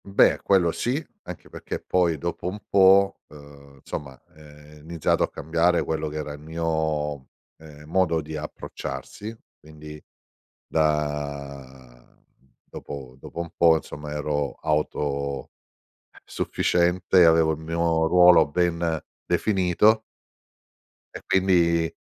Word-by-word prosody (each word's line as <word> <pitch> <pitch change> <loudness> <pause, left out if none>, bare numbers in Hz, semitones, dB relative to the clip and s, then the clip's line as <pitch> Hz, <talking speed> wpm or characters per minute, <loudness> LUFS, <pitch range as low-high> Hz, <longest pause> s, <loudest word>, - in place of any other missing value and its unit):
Beh, 100 0 +3
quello 90 -4 +3
sì, 135 - -2 0.2
anche - - -9
perché - - -6
poi 85 -3 +1
dopo 85 +3 -4
un 100 +3 -4
po', 95 0 +5
uhm, 70 -2 -16
insomma, 65 -2 -7
uhm, - - -29
è 75 0 -16
iniziato 80 +1 -1
a - - +2
cambiare 85 +3 +1
quello 80 -1 -2
che 75 - -9
era 75 -1 -5
il 75 - -10
mio, 80 -1 -2 0.4
uhm, 75 -2 -14
modo 85 0 +1
di 80 0 -7
approcciarsi, 105 +7 -7 0.2
quindi 75 0 -12 0.6
da 70 -5 -3 0.6
dopo 65 -3 -9
dopo - - -10
un 85 -1 -5
po', 85 -1 +5
insomma, 75 -1 -7
ero 75 -1 -2 1.4
autosufficiente, 90 +1 0
avevo 80 -1 +4
il 75 - -7
mio 80 0 0
ruolo 90 -1 +6
ben 85 +1 0 0.3
definito 95 +4 +2 1.1
e - - -7
quindi, 85 -3 +2
80 Hz, 115 wpm, -24 LUFS, 75-90 Hz, 1.4 s, ruolo